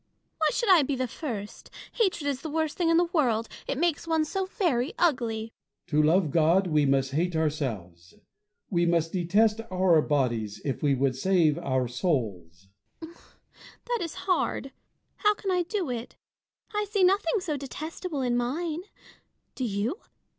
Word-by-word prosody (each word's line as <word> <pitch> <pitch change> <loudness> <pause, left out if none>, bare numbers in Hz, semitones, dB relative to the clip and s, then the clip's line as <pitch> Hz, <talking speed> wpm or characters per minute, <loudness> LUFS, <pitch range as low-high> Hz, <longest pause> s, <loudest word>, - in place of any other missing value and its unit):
Why - - +3
should 470 -4 +2
I 355 -4 +7
be 280 0 -1
the 255 0 -1
first 225 -6 -6 0.2
1 - - -20
Hatred 340 -6 -2
is 275 -2 -1
the 320 - -5
worst 315 0 -1
thing 345 -3 +1
in 330 - +4
the 345 - +5
world: 235 -8 +2 0.2
it 275 - -2
makes 330 0 0
one 320 -1 +2
so 380 +4 -2
very 340 - 0
ugly. 230 - 0 0.3
Bossuet. - - -29
To 150 0 +4
love 160 +1 +3
God, 170 +5 +3
we 150 -4 +2
must 135 -1 +2
hate 170 +4 0
ourselves. 110 - -3 0.6
We 175 -2 +2
must 165 -1 +1
detest 210 +5 +2
our 185 -4 +4
bodies, 120 -9 -1
if 135 - -2
we 145 -2 +3
would 135 0 +1
save 165 0 +2
our 130 -2 0
souls. 105 - -2 0.3
Fontanges. 330 +1 -11 0.7
That 480 -1 +1
is 335 -2 -3
hard: 350 -7 0 0.5
how 420 0 +3
can 395 -2 -3
I 360 -1 +2
do 350 - -2
it? 235 0 -6 0.6
I 420 0 -1
see 405 -2 +1
nothing 380 +1 +3
so 345 -5 -3
detestable 295 +2 -5
in 245 -1 +1
mine. 305 +7 -1 0.7
Do 260 - -3
you 220 - -2
230 Hz, 170 wpm, -27 LUFS, -, 0.7 s, I